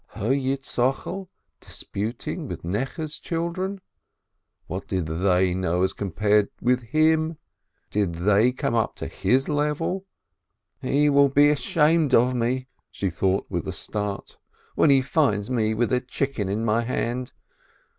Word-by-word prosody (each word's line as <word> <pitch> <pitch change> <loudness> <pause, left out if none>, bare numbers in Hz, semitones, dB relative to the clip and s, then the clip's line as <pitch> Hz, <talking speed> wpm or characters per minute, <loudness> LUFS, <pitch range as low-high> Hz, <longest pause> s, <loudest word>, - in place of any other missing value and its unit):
Her 110 +3 -1
Yitz 135 0 -2
chokel 135 +9 -1 0.3
disputing 110 +4 -5
with - - -6
Necheh's 135 - -3
children? 185 +4 -3 0.8
What 90 +4 -6
did 95 -3 -1
they 90 +3 +2
know 90 -1 0
as 95 - +1
compared 105 +2 +1
with 125 +1 +2
him? 155 +5 +2 0.5
Did 100 -4 0
they 105 +7 +3
come 125 -2 -2
up 115 -2 0
to - - -6
his 130 +2 +1
level? 150 +6 -1 0.7
"He 145 +3 +2
will 140 -1 +5
be 145 +2 +5
ashamed 155 -1 +3
of 125 +2 +4
me," 125 +2 -1 0.2
she 95 -2 -3
thought 95 +3 0
with - - -3
a - - -1
start, 105 -2 -4 0.3
"when 155 - +4
he 135 -2 +5
finds 130 -7 +1
me 110 -3 +1
with 120 +3 0
a 125 - +2
chicken 130 -5 -2
in 110 +3 -1
my 110 +1 +2
hand. 125 +1 -2
125 Hz, 145 wpm, -24 LUFS, 105-145 Hz, 0.8 s, will